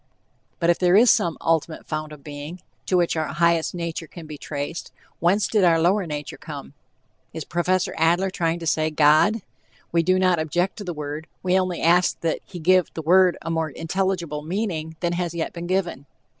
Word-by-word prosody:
But 170 0 +4
if 170 - -1
there 180 0 +4
is 230 +4 +7
"some 175 -7 +1
ultimate 165 -1 0
fount 155 0 -4
of 150 -2 -12
being," 150 +4 -8 0.3
to 185 - +2
which 175 -1 +1
our 160 -1 -1
"highest" 170 +1 +1
nature 170 -1 -4
"can 170 0 -11
be 155 -1 -8
traced," 145 +2 -5 0.3
whence 190 +5 +2
did 210 -3 +2
our 165 -2 +5
lower 180 +3 +2
nature 150 -2 -5
come? - - -8 0.6
Is 160 -1 -5
Prof. 175 +4 0
Adler 175 +4 +2
trying 165 -2 0
to 170 - -7
say 155 0 +1
God? 155 +8 +4 0.5
We 170 - +3
do 185 +3 +2
not 185 -2 +3
object 175 +4 -1
to 210 - -6
the 180 - -4
word, 150 +1 -5 0.2
we 185 +1 +3
only 185 -2 -2
ask 175 +2 +3
that 165 -1 0
he 185 - -10
give 180 +1 +3
the 160 - -4
word 180 +2 +5
a 165 - -3
more 160 -1 -1
intelligible 170 -1 -2
meaning 160 -2 -3
than 175 -1 0
has 175 -1 -2
yet 165 - -3
been 170 0 -6
given. 175 -7 -2
170 Hz, 200 wpm, -23 LUFS, 160-185 Hz, 0.6 s, is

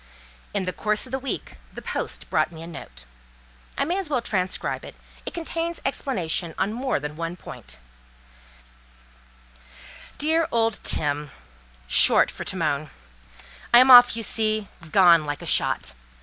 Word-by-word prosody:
In 200 - -2
the 185 0 -3
course 215 +2 +1
of 255 - -12
the 265 - -2
week, 270 0 -5
the - - -9
post - - -4
brought - - +1
me 165 -1 -10
a - - -8
note. 65 - -11 0.7
I - - 0
may 350 +5 -1
as 375 -6 -4
well 270 -4 +1
transcribe 190 -5 -2
it; - - -11 0.3
it - - -4
contains 335 0 -3
explanation 180 - -2
on 195 +3 -1
more 255 - -1
than 150 +1 -6
one 165 +2 -5
point:— 60 - -11 2.4
'DEAR 320 +2 +1
OLD 225 -1 0
TIM 145 0 -1 0.6
"(short - - +5
for - - -7
Timon),—" 155 -5 -2 0.8
I 240 - +8
am 255 +1 +7
off 245 -1 +9
you 225 - -3
see—gone 190 -7 +2
like 145 0 -4
a - - -8
shot. 65 - +1
195 Hz, 150 wpm, -24 LUFS, 160-255 Hz, 2.4 s, off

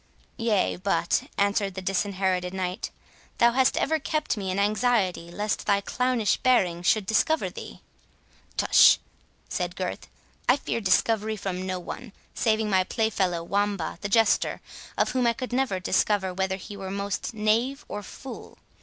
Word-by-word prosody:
"Yea, 225 -5 +1
but," 180 -2 0
answered 200 -1 +1
the - - -3
Disinherited 190 -1 -1
Knight, 185 0 -3 0.5
"thou 235 0 +5
hast 260 +1 +2
ever 315 +2 +1
kept 305 -1 -1
me 195 -3 -4
in 185 - -1
anxiety 205 -4 +1
lest 210 +4 -3
thy 200 - +4
clownish 245 +1 0
bearing 185 -10 +2
should 200 +3 +2
discover 270 +10 +1
thee." - - -9 0.8
"Tush!" - - +7 0.5
said - - -3
Gurth, - - -4 0.4
"I 250 - +6
fear 230 - -3
discovery 215 +2 +2
from 185 -2 -4
none, 185 +5 -6 0.2
saving 220 -1 +1
my 190 -2 +3
playfellow, 190 -5 0
Wamba 200 -2 -1
the 200 - -3
Jester, 225 +2 +3 0.4
of - - +2
whom 250 -1 +1
I 235 - +3
could 255 0 -6
never 250 -7 0
discover 190 +1 +1
whether 190 +1 -1
he 200 +2 -9
were 195 -1 -6
most 200 +4 -3
knave 230 +6 +1
or 205 - -5
fool. 255 +6 -10
205 Hz, 150 wpm, -26 LUFS, 190-230 Hz, 0.8 s, Tush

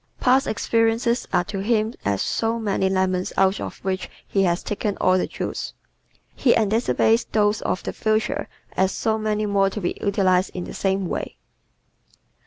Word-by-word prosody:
Past 260 +2 +3
experiences 230 +2 +1
are 175 - +3
to 200 +1 -5
him 215 +2 +1
as 100 -1 0
so 225 +1 0
many 200 -4 0
lemons 185 -1 0
out 195 +1 +3
of - - -6
which 185 -1 -2 0.2
he 195 - +1
has 175 -2 +1
taken 205 -1 -2
all 185 - +3
the 185 - +1
juice. - - -5 0.6
He 245 - +3
anticipates 225 +1 +2
those 210 -1 +1
of 185 - -2
the - - -4
future 215 0 0 0.3
as 190 0 +2
so 220 +2 0
many 215 0 0
more 200 -1 +2
to 205 - -5
be 175 -3 -2
utilized 190 -2 +2
in 180 - -3
the - - -8
same 195 0 0
way. - - -4
205 Hz, 170 wpm, -23 LUFS, 190-220 Hz, 0.6 s, Past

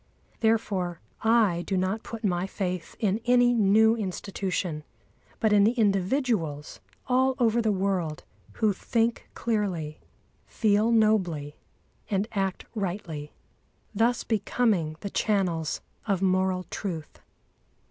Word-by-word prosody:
Therefore 205 -6 0 0.2
I 220 -6 +3
do 190 +2 -2
not 190 +4 0
put 230 -1 -8
my 180 -2 0
faith 180 -3 -4
in 210 +1 +1
any 245 0 +5
new 220 +1 +5
institution, 185 -5 -3 0.6
but 220 -3 +3
in 205 -1 +6
the 220 +3 +4
individuals 195 - 0 0.3
all 260 +1 +2
over 235 -2 +3
the 220 -2 +2
world 185 -5 -1 0.3
who 215 -2 +1
think 230 +4 -1
clearly, 190 -9 -2 0.5
feel 215 +1 +2
nobly, 185 -10 +2 0.5
and 200 0 0
act 195 -3 -2
rightly, 175 -8 -4 0.6
thus 230 +4 +2
becoming 210 -7 0
the 200 - -5
channels 180 -7 0 0.3
of 195 -3 +1
moral 185 -1 +1
truth. 165 -6 -5
200 Hz, 115 wpm, -27 LUFS, 180-225 Hz, 0.6 s, in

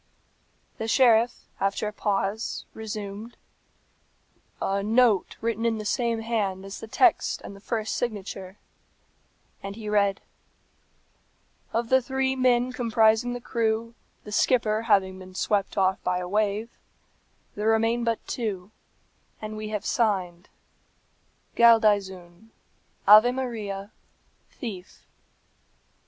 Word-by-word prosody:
The 225 - -3
sheriff, 235 -1 +3
after 195 +2 0
a 210 - -5
pause, 205 +2 -2
resumed, 215 +1 -7 1.2
a 195 +1 -1
"note 220 -1 +2
written 230 -1 -1
in 230 -1 +1
the 215 - -6
same 230 +1 0
hand 205 -5 -2
as 195 0 -7
the 225 - -8
text 350 - +2
and 200 - -9
the - - -13
first 220 +1 -3
signature," 200 -4 -5 1.0
and 195 0 -6
he 220 -1 -8
read, 200 -2 +1 1.5
"Of 230 0 -1
the 260 0 +5
three 265 +1 -1
men 255 -1 +2
comprising 230 -1 +2
the 245 - -4
crew, 230 -1 -1 0.3
the 210 - -10
skipper 220 -1 +2
having 190 -4 +2
been 185 0 -12
swept 200 0 -1
off 190 -1 +2
by 180 0 0
a 180 0 -4
wave, 210 +3 -1 0.7
there 210 +1 -3
remain 225 +2 +2
but 230 -1 -1
two, 205 -5 -4 0.7
and 215 0 -6
we 215 0 -5
have 210 -2 -4
signed, 185 -6 -1 1.1
Galdeazun; 205 -4 +3 0.6
Ave 215 +4 +9
Maria, 220 -6 -4 0.6
Thief." 195 -8 -9
215 Hz, 115 wpm, -26 LUFS, 200-230 Hz, 1.5 s, Ave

